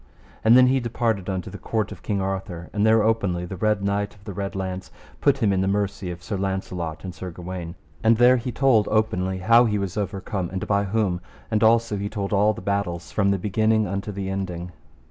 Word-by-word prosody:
And 115 +3 +7
then 130 - +8
he 130 +1 +3
departed 115 -5 -1
unto 95 -2 -3
the - - -8
court 110 -3 -2
of - - -9
King 100 -2 -1
Arthur, 95 -3 -4
and 105 - +1
there 110 -1 +5
openly 100 -6 +1
the 90 - -6
Red 105 +1 +1
Knight 100 +1 -1
of 100 - -21
the 100 - -7
Red 100 +1 -4
Launds 95 -1 -4 0.3
put 140 -1 +3
him 100 -2 +3
in 95 - +1
the 95 - +1
mercy 100 -2 -1
of 90 0 -7
Sir 105 -3 -3
Launcelot 95 -4 -3
and 90 -2 -6
Sir 90 0 -7
Gawaine, 90 0 -7 0.3
and 115 0 +5
there 125 +2 +6
he 125 +1 -3
told 120 -4 +3
openly 95 -4 +1
how 115 +6 +5
he 105 -2 +1
was 100 -1 -3
overcome 95 -2 -3
and 95 0 -4
by 100 0 +1
whom, 95 -3 0 0.3
and 110 0 +2
also 115 -1 +3
he 100 +1 -3
told 100 -1 -3
all 105 +2 +4
the - - -8
battles 95 -3 -2
from 100 -2 +2
the 100 - +2
beginning 110 +3 +2
unto 100 +2 -3
the 100 -1 -4
ending. 90 -2 -4
100 Hz, 220 wpm, -24 LUFS, 95-110 Hz, 0.3 s, then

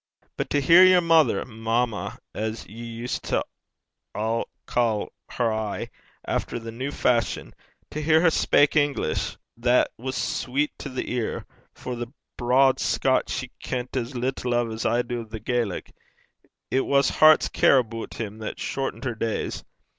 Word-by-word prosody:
But - - -3
to 145 - +2
hear 170 +6 +8
yer 185 -1 +7
mother 160 - +3
mamma, 115 -1 -2 0.2
as 110 +1 -4
ye 115 +3 -10
used 115 +1 -4
to - - +1 0.7
ca' 110 0 -1 0.2
her 115 -3 0
aye, 110 -2 -3 0.4
efter - - -2
the 115 -1 -7
new 130 +5 -4
fashion 115 -9 0 0.4
to 150 - -4
hear 160 +1 +4
her 165 -2 +5
speyk 145 -1 +3
English, 145 - 0 0.2
that 120 +1 +2
was 130 +2 -4
sweet 135 +4 -1
to 140 - -6
the 130 - -4
ear; 120 -3 -2 0.3
for 125 - -5
the 120 0 -6 0.2
braid 130 +2 +3
Scotch 130 -1 +1
she 125 -1 -4
kent 125 0 -4
as 125 +1 -2
little 125 0 -1
o' 120 -1 0
as 110 0 -2
I 120 +2 +2
do 120 0 -4
o' - - -6
the 110 0 -8
Erse. 115 -3 -2 0.8
It 130 - +3
was 140 0 +3
hert's 155 0 +6
care 140 - +4
aboot 115 -2 -2
him 110 -1 -5
that 110 - -5
shortent 135 0 -3
her 125 -3 -1
days. 115 0 -3
120 Hz, 160 wpm, -25 LUFS, 115-135 Hz, 0.8 s, hear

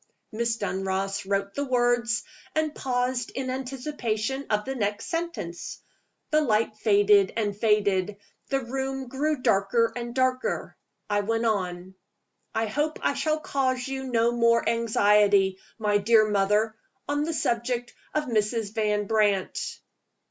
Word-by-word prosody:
Miss 230 +1 -1
Dunross 195 -1 -2
wrote 200 0 0
the 285 - -2
words, 240 -3 +1 0.3
and 310 -1 +1
paused 250 -2 -1
in 260 -1 -2
anticipation 260 -1 -3
of 210 -1 +1
the 265 - -3
next 205 -5 -2
sentence. 330 - -4 0.5
The 305 0 +4
light 220 -5 +1
faded 205 -2 +4
and 205 -3 0
faded; 205 -2 +1 0.3
the 270 -1 +1
room 265 +1 -4
grew 280 +1 -1
darker 200 +4 +2
and 240 0 -5
darker. 255 0 0 0.3
I 205 0 +1
went 225 +3 -1
on. 185 -4 -1 0.6
"I 225 - +1
hope 295 +8 -1
I - - +2
shall 310 0 0
cause 260 -3 -1
you 265 0 -4
no 235 -2 +2
more 235 -1 +3
anxiety, 205 -4 +3 0.2
my 210 -2 +2
dear 215 +1 +5
mother, 210 +2 +2 0.3
on 290 +1 0
the 325 - -1
subject 240 -1 -1 0.2
of 305 - +2
Mrs. 220 -2 0
Van 210 -2 0
Brandt." 205 -3 0
230 Hz, 135 wpm, -26 LUFS, 205-255 Hz, 0.6 s, dear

